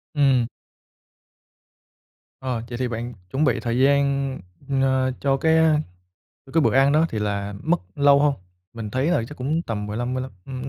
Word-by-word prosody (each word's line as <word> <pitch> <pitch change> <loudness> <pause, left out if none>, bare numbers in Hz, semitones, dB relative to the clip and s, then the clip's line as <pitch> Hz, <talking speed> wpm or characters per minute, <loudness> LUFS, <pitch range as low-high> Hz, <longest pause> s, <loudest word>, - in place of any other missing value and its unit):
Ừm. 135 -5 +3 1.9
Ờ, 125 -3 -2
vậy 120 - -5
thì 125 -1 -1
bạn 120 +1 -5 0.2
chuẩn 145 +3 0
bị 125 - +2
thời 120 +1 -1
gian, 140 0 +2 0.4
n 135 - +2 0.4
cho 135 -1 +1
cái, 160 +2 +3
ơ, 160 -1 +4 0.7
cho 135 - -14
cái 165 - +4
bữa - - +2
ăn 135 +1 +5
đó 160 +2 +4
thì 110 - -4
là 100 -1 -2
mất 170 +2 +1
lâu 140 0 +5
hông? 145 -1 +3 0.4
Mình 110 -3 -6
thấy 130 +5 0
là 175 -8 +2
chắc 150 - -11
cũng 155 +6 -1
tầm 105 -6 -4
15, 120 +4 -3
mươi 130 - -2
lăm, 130 - -7 0.2
ưm, 130 0 -5
135 Hz, 185 wpm, -23 LUFS, 120-140 Hz, 1.9 s, ăn